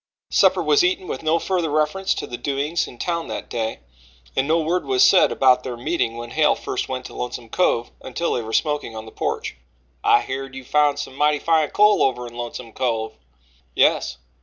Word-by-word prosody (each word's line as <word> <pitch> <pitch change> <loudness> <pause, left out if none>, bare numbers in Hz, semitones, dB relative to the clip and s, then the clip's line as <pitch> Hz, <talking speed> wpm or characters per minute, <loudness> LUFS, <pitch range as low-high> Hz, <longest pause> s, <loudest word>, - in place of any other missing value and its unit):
Supper - - +4
was 425 -4 +4
eaten 370 +1 +1
with - - -4
no 160 +1 +2
further 175 -2 -1
reference 155 +6 0
to - - -4
the 120 - -6
doings 140 +6 -1
in 120 - -12
town 170 +4 -2
that - - -6
day, 115 -2 -3 0.5
and 135 - +1
no 165 +2 +3
word 170 +3 0
was 130 -2 +3
said - - +5
about 130 -1 +4
their 125 -2 -5
meeting 120 -2 -1
when 120 0 -7
Hale 155 -1 +3
first - - -4
went 130 -1 -4
to - - -9
Lonesome 120 -1 -5
Cove 120 -8 +1
until 150 +6 -2
they 120 - -1
were 110 0 -7
smoking 150 -3 -1
on 110 0 -7
the 110 - -11
porch. - - -3 0.5
"I 120 - +5
heerd 135 0 -5
you 130 - -7
found 145 +2 +2
some 145 -2 -5
mighty 150 +1 +2
fine 160 0 +2
coal 210 0 +4
over 125 -2 +1
in 120 - -9
Lonesome 120 -1 -7
Cove." 115 -3 -1 0.6
"Yes." - - +2
135 Hz, 205 wpm, -22 LUFS, 120-160 Hz, 0.6 s, said